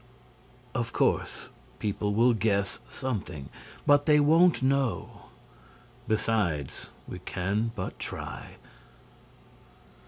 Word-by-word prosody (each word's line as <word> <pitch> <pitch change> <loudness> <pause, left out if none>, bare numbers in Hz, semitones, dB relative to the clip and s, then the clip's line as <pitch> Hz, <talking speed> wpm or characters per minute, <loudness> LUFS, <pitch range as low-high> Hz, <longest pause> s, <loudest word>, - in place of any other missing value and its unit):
"Of 115 -3 -2
course, - - 0 0.3
people 105 0 -1
will 120 +2 +5
guess 100 -3 0
something, 95 - -4 0.4
but 145 +1 +5
they 150 -1 +6
won't 160 +1 +5
know. 130 -8 0 0.8
Besides, 105 -10 0 0.2
we - - -6
can 105 +5 -1
but 90 -4 -5
try." - - -6
110 Hz, 90 wpm, -28 LUFS, 100-135 Hz, 0.8 s, they